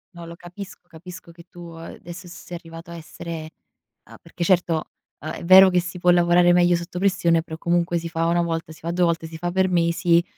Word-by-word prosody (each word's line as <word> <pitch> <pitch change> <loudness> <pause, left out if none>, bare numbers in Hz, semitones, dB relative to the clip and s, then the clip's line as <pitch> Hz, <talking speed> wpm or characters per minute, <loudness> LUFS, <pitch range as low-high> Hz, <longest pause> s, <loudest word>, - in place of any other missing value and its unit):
No, 170 -1 -9
lo 170 0 -10
capisco, 175 +1 -11
capisco 175 +1 -12
che 170 0 -15
tu, 170 -1 -11
ehm, 165 - -9
adesso 175 +1 -10
sei 175 0 -10
arrivato 165 0 -12
a 170 - -8
essere 165 -1 -8 0.5
a - - -15
perché 170 +1 -6
certo, 170 -3 +1 0.3
uhm, 155 - -6
è - - -8
vero 190 +2 +8
che 180 -1 +2
si 180 +1 -7
può 175 - +2
lavorare 175 0 +4
meglio 175 0 +4
sotto 175 +1 -7
pressione, 170 -4 +2
però 160 -1 -9
comunque 170 +1 0
si 170 0 -4
fa 165 0 -2
una 170 +1 +2
volta, 165 -1 -3
si 160 - -13
fa 170 - -4
2 180 +1 +1
volte, 165 -1 -1
si 160 - -11
fa 175 +2 -3
per 190 +1 +2
mesi, 170 0 +2
170 Hz, 225 wpm, -22 LUFS, 165-175 Hz, 0.5 s, vero